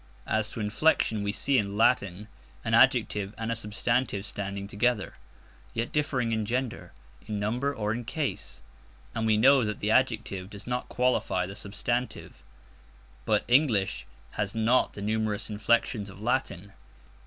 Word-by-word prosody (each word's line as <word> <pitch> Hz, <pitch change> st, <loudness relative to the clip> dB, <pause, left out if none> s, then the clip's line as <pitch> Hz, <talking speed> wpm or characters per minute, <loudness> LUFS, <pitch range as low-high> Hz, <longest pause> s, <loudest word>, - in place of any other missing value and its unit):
As 110 Hz, 0 st, 0 dB
to -, -, -7 dB
inflection, 110 Hz, 0 st, +2 dB
we 100 Hz, 0 st, -1 dB
see 135 Hz, +4 st, +2 dB
in 100 Hz, 0 st, -3 dB
Latin 105 Hz, -4 st, +2 dB, 0.4 s
an -, -, -1 dB
adjective 100 Hz, 0 st, +3 dB
and 115 Hz, 0 st, -3 dB
a -, -, 0 dB
substantive 115 Hz, 0 st, -1 dB
standing 100 Hz, -1 st, -4 dB
together, 105 Hz, 0 st, 0 dB, 0.6 s
yet 115 Hz, +1 st, -2 dB
differing 130 Hz, -6 st, 0 dB
in 110 Hz, -1 st, 0 dB
gender, 115 Hz, -5 st, -3 dB, 0.4 s
in 105 Hz, -1 st, -3 dB
number, 120 Hz, +7 st, 0 dB
or 105 Hz, -5 st, -2 dB
in 120 Hz, +1 st, -4 dB
case; 145 Hz, +4 st, -4 dB, 0.5 s
and 110 Hz, 0 st, -1 dB
we 110 Hz, -1 st, +4 dB
know 135 Hz, +3 st, +6 dB
that 105 Hz, -1 st, -3 dB
the 105 Hz, -, 0 dB
adjective 110 Hz, -6 st, +1 dB
does 100 Hz, -1 st, -9 dB
not 125 Hz, 0 st, -3 dB
qualify 125 Hz, -7 st, +1 dB
the 95 Hz, +2 st, -8 dB
substantive. 110 Hz, +5 st, -3 dB, 0.8 s
But -, -, +2 dB
English 120 Hz, -, +2 dB, 0.2 s
has 105 Hz, 0 st, -3 dB
not 115 Hz, +3 st, +2 dB
the 100 Hz, -, -7 dB
numerous 110 Hz, 0 st, -1 dB
inflections 105 Hz, 0 st, +1 dB
of 100 Hz, -, -12 dB
Latin. 105 Hz, -5 st, -2 dB
110 Hz, 150 wpm, -28 LUFS, 100-125 Hz, 0.8 s, know